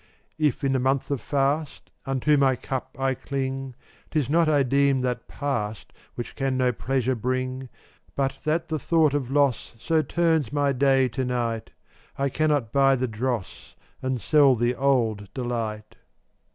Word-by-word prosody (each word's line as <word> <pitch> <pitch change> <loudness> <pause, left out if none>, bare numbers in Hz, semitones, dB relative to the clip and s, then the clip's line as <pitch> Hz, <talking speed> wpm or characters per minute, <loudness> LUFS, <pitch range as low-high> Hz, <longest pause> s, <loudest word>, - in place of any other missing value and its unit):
410 155 -1 +3
If 145 - -3
in 135 -1 +2
the 130 - +2
month 135 +2 0
of 140 - -1
fast 140 +1 -1 0.2
Unto 135 +3 +2
my 135 -2 +3
cup 130 +1 -5
I 135 0 +1
cling, 135 -1 -4 0.3
'Tis 145 -4 -1
not 165 0 +4
I 145 -2 +4
deem 140 +1 +2
that 125 -2 -2
past 110 -7 -4 0.2
Which 120 - -6
can 135 -1 -1
no 125 -1 +2
pleasure 130 +1 -1
bring, 130 +2 -3 0.5
But 135 -1 -1
that 160 +2 0
the 155 -1 -1
thought 160 0 +2
of 140 -4 -1
loss 140 -4 +1
So 160 +6 +1
turns 160 -3 +1
my 145 -1 +1
day 135 0 +3
to 130 +3 -3
night, 120 -3 -2 0.5
I 140 0 0
cannot 145 -5 0
buy 135 -1 +5
the 130 0 -1
dross 115 -2 -4 0.3
And 130 -1 -1
sell 145 -1 +5
the 120 +1 +1
old 120 -7 0
delight. 115 -4 -4
135 Hz, 165 wpm, -25 LUFS, 125-140 Hz, 0.5 s, buy